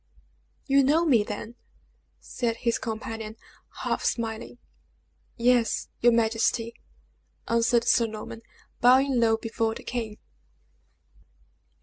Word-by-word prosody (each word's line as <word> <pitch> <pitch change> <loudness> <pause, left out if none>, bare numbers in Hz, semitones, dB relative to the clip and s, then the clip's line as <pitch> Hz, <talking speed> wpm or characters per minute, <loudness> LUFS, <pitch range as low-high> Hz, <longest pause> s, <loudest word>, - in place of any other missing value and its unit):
"You 275 -1 +4
know 310 +5 +3
me, 250 -9 +4
then?" 210 +2 -6 0.7
said 235 -2 -2
his 235 0 -1
companion, 220 -1 -5 0.5
half - - -1
smiling. 230 0 -3 0.8
"Yes, 240 -1 +2
your 240 - +5
majesty," 230 0 +1 0.7
answered 235 0 +2
Sir 230 - +4
Norman, 220 +1 -8 0.4
bowing 260 +1 +4
low 225 -1 +3
before 225 0 -2
the - - -9
king. 225 -4 -4
230 Hz, 100 wpm, -26 LUFS, 225-245 Hz, 0.8 s, your